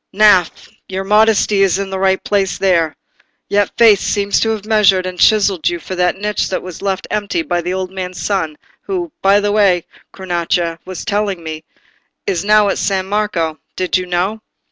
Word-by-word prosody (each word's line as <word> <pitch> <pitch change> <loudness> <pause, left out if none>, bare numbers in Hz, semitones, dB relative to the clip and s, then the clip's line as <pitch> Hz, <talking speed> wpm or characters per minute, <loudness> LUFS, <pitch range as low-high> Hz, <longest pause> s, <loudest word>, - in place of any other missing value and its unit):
"Gnaffè, 200 -5 +3 0.2
your 190 0 -3
modesty 210 0 +3
is 195 -1 +3
in 195 -1 -4
the 190 - -3
right 190 0 +1
place 195 -3 0
there. 170 -5 +1 0.5
Yet 205 -1 +1
fate 220 -4 +6
seems 200 0 0
to 225 - +1
have 215 -2 -3
measured 200 -4 +3
and 180 -1 -6
chiselled 200 -6 +3
you 175 - -3
for 185 - -7
the 180 -1 +2
niche 210 +2 -2
that 190 - -3
was 180 -2 -9
left 195 -1 -2
empty 210 +11 -1
by 175 - -1
the 180 +2 -3
old 185 -1 -4
man's 185 -1 -6
son, 165 -7 -2 0.2
who, 360 -4 -4
by 195 +1 +4
the 205 0 0
way, 195 -5 +3 0.3
Cronaca 170 -2 -2
was 185 -1 -7
telling 205 -5 -1
me, 155 -1 -6 0.6
is 175 -1 -1
now 210 0 +4
at - - -1
San 190 -2 0
Marco. 190 -7 -1 0.2
Did 185 -1 -1
you 185 -1 0
know?" 185 +5 -1
195 Hz, 190 wpm, -16 LUFS, 180-205 Hz, 0.6 s, fate